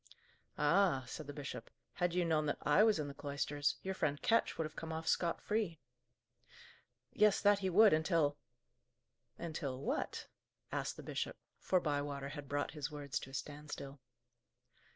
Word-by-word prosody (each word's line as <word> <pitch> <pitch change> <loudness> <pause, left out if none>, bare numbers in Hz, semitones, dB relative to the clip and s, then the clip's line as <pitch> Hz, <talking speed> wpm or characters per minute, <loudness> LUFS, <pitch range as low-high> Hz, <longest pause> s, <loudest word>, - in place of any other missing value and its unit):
"Ah!" 150 -2 +3
said 150 +4 -7
the - - -4
bishop, 135 -5 -6 0.2
"had 175 -1 0
you 180 -1 +2
known 155 -2 +2
that 145 - 0
I 150 +7 +5
was 220 -1 +5
in 150 -2 -2
the 140 - -6
cloisters, 145 0 -1
your 190 - -2
friend 145 -6 0
Ketch 230 0 +2
would 160 - 0
have 155 - -7
come 160 0 -5
off 160 0 -4
scot 170 -1 +2
free!" 210 -7 -1 1.3
"Yes, 210 -1 +5
that 205 0 +5
he 190 -1 0
would, 210 +2 +7
until 155 -2 +2 0.5
" 120 0 -49
"Until 140 -5 -3
what?" 140 - -2 0.5
asked - - -2
the - - -8
bishop, - - -3 0.2
for 185 - +2
Bywater 145 -3 -2
had 145 -2 -7
brought 145 0 -1
his 150 -2 -4
words 145 -3 -3
to - - -9
a - - -14
standstill. 145 -1 -6
150 Hz, 170 wpm, -36 LUFS, 140-175 Hz, 1.3 s, would